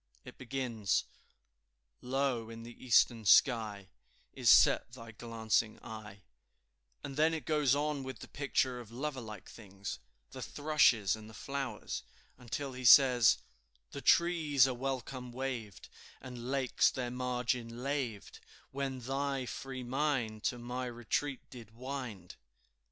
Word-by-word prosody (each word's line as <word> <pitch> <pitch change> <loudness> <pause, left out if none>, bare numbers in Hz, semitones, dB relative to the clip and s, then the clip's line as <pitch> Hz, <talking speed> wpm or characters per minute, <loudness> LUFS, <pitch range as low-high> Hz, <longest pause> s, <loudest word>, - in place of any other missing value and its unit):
It - - -12
begins, 125 -6 -1 1.0
"Low 125 -3 -1
in 115 0 -9
the 120 0 -12
eastern 120 -2 +4
sky 105 -3 +4 0.5
Is - - +2
set 115 - +6
thy 115 -2 -10
glancing 110 -1 -1
eye," 105 -3 -9 0.8
and 140 -1 -6
then 160 +2 +3
it 160 - -6
goes 150 -4 +3
on 145 -1 -1
with 130 0 -6
the - - -10
picture 130 -3 -1
of 120 -3 -10
lover 135 +3 -4
like 110 -4 -9
things, 100 -3 -8 0.3
the - - -8
thrushes 130 -10 +3
and 110 0 -11
the 110 - -13
flowers, 140 -2 -4 0.4
until, 130 +3 -4
he 130 0 -7
says, 125 -2 +7 0.5
"The 140 - -6
trees 160 -7 +4
a 130 - 0
welcome 130 -1 -4
waved, 120 -6 -5 0.3
And 125 -1 -8
lakes 135 -2 +2
their 125 -2 -4
margin 125 -1 -2
laved, 135 -7 -3 0.3
When 135 -1 -3
thy 135 +1 -2
free 130 +1 -6
mind 125 -4 -1
To 125 - 0
my 125 +2 -4
retreat 125 +3 -3
did 115 -3 -12
wind." 125 -8 -6
125 Hz, 135 wpm, -33 LUFS, 115-135 Hz, 1.0 s, says